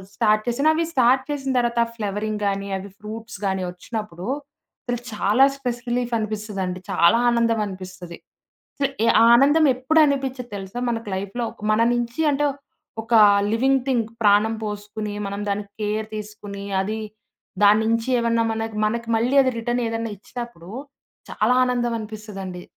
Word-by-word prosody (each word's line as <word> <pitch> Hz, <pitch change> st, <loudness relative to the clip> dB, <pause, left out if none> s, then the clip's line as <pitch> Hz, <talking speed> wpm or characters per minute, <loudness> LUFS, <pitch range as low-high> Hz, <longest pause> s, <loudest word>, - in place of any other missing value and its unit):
Start 215 Hz, 0 st, +2 dB
చేశాను. 280 Hz, +6 st, +3 dB
అవి 330 Hz, +1 st, 0 dB
start 260 Hz, 0 st, +4 dB
చేసిన 275 Hz, -2 st, -2 dB
తర్వాత 235 Hz, -1 st, +1 dB
ఫ్లవరింగ్ 210 Hz, 0 st, -3 dB
గాని, 195 Hz, 0 st, -2 dB
అవి 200 Hz, +2 st, -9 dB
ఫ్రూట్స్ 220 Hz, 0 st, -8 dB
గాని 190 Hz, -1 st, 0 dB
వచ్చినప్పుడు 180 Hz, -1 st, -6 dB, 0.6 s
అసలు 245 Hz, -3 st, -2 dB
చాలా 210 Hz, +5 st, +3 dB
స్ట్రెస్‌ 245 Hz, -3 st, -4 dB
రిలీఫ్ 245 Hz, 0 st, -1 dB
అనిపిస్తదండి. 210 Hz, -4 st, -3 dB
చాలా 175 Hz, +3 st, +5 dB
ఆనందం 230 Hz, -1 st, +2 dB
అనిపిస్తది. 185 Hz, -2 st, -9 dB, 0.6 s
అసలు 275 Hz, -1 st, 0 dB, 0.4 s
ఆనందం 285 Hz, +6 st, +5 dB
ఎప్పుడ 260 Hz, +5 st, -2 dB
అనిపించద్ది 265 Hz, -3 st, -2 dB
తెలుసా? 195 Hz, +5 st, -6 dB
మనకు 230 Hz, -2 st, -4 dB
లైఫ్‌లో 200 Hz, +5 st, -3 dB, 0.3 s
మన 215 Hz, -, +2 dB
నుంచి 240 Hz, +3 st, -2 dB
అంటే 290 Hz, +1 st, +1 dB, 0.6 s
ఒక 230 Hz, +1 st, -2 dB, 0.4 s
లివింగ్ 265 Hz, +3 st, +2 dB
థింగ్ 240 Hz, -4 st, +1 dB, 0.2 s
ప్రాణం 210 Hz, +2 st, +4 dB
పోసుకొని 210 Hz, 0 st, -5 dB
మనం 200 Hz, +1 st, -4 dB
దానికి 200 Hz, 0 st, -3 dB
కేర్ 215 Hz, +1 st, -1 dB
తీసుకొని 205 Hz, -1 st, -7 dB, 0.2 s
అది 215 Hz, +3 st, -2 dB, 0.6 s
దాని 205 Hz, +1 st, +6 dB
నుంచి 230 Hz, +1 st, 0 dB
ఏమన్నా 230 Hz, -1 st, +2 dB
మన, 225 Hz, 0 st, -2 dB, 0.2 s
మనకి 230 Hz, +2 st, -1 dB
మళ్ళీ 240 Hz, +5 st, +1 dB
అది 260 Hz, -, +2 dB
రిటర్న్ 240 Hz, +1 st, -1 dB
ఏదన్నా 225 Hz, 0 st, -3 dB
ఇచ్చినప్పుడు 235 Hz, -4 st, -9 dB, 0.6 s
చాలా 220 Hz, +4 st, +2 dB
ఆనందం 240 Hz, -1 st, 0 dB
అనిపిస్తదండి. 210 Hz, -4 st, -7 dB
225 Hz, 140 wpm, -23 LUFS, 205-240 Hz, 0.6 s, దాని